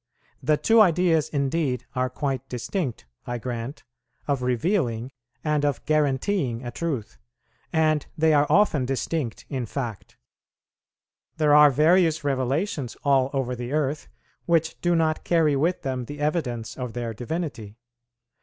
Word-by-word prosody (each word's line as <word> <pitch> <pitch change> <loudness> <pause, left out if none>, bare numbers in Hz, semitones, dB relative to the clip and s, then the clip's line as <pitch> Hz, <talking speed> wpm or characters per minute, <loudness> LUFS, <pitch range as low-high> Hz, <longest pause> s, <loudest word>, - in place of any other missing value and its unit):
The 155 -1 +2
two 225 +6 +5
ideas 170 -5 +3
indeed 140 -3 -1
are 130 -1 0
quite 135 0 -3
distinct, 125 - -3 0.2
I 120 0 -2
grant, 120 +3 -5 0.4
of 140 -3 0
revealing 125 - 0 0.3
and 150 -1 +1
of 145 -5 -1
guaranteeing 140 - 0
a 120 - -4
truth, 135 -6 -4 0.5
and 155 -2 +2
they 160 0 +4
are 145 0 +4
often 195 -10 +3
distinct 135 0 -3
in 130 -4 -3
fact. 120 -4 -6 1.2
There 150 -2 +3
are 150 0 +8
various 160 +3 +3
revelations 135 - -1
all 135 -2 +3
over 130 -3 -1
the 120 +2 -5
earth 150 -1 -1 0.4
which 165 -1 +1
do 175 0 +2
not 160 -1 +1
carry 160 -4 +3
with 165 +6 0
them 130 -2 -2
the 145 +4 -8
evidence 140 -7 -2
of 125 -3 -4
their 120 -2 -3
divinity. 120 - -5
140 Hz, 135 wpm, -25 LUFS, 125-160 Hz, 1.2 s, are